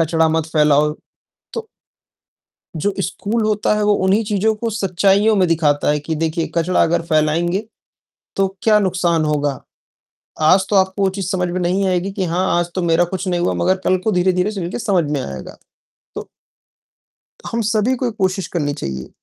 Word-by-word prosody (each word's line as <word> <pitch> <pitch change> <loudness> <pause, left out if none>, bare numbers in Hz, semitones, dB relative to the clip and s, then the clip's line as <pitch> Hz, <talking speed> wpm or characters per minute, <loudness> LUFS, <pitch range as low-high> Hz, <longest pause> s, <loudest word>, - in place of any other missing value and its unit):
कचरा 160 0 +2
मत 160 0 0
फैलाओ। 150 0 +3 0.6
तो 455 -1 -5 1.1
जो 200 +6 0
स्कूल 205 +5 -2
होता 210 0 +1
है 210 - 0
वो 210 - +3
उन्हीं 200 +4 +3
चीज़ों 210 +1 +1
को 230 +1 -3
सच्चाईयों 200 +1 +2
में 185 -2 +3
दिखाता 150 -3 +2
है 150 - +1
कि 160 +2 -3
देखिए 160 +1 -1
कचरा 170 +2 +2
अगर 170 +1 +1
फैलाएँगे 170 +6 +1 0.7
तो 195 0 +2
क्या 215 -1 +4
नुकसान 175 -4 +1
होगा। 145 -2 -1 0.9
आज 190 +3 +4
तो 205 - +3
आपको 190 +1 +1
वो 195 - +3
चीज़ 190 -2 -5
समझ 180 -2 0
में 180 +1 -3
नहीं 185 +3 0
आएगी 185 +1 0
कि 195 -1 -2
हाँ, 180 +2 0
आज 175 0 -1
तो 185 - -1
मेरा 170 +1 +3
कुछ 190 +2 -5
नहीं 175 -1 0
हुआ, 175 - 0
मगर 185 +1 +1
कल 185 - +3
को 220 - +1
धीरे-धीरे 180 +2 +1
चलके 185 -3 -4
समझ 195 -8 +1
में 145 -2 -1
आएगा। 65 -2 -8 0.6
तो - - -7 1.2
हम 230 - -2
सभी 220 +3 +1
को 250 - -2
एक 230 - -6
कोशिश 190 0 0
करनी 145 -5 -2
चाहिए 65 - -6
180 Hz, 180 wpm, -19 LUFS, 165-200 Hz, 1.2 s, क्या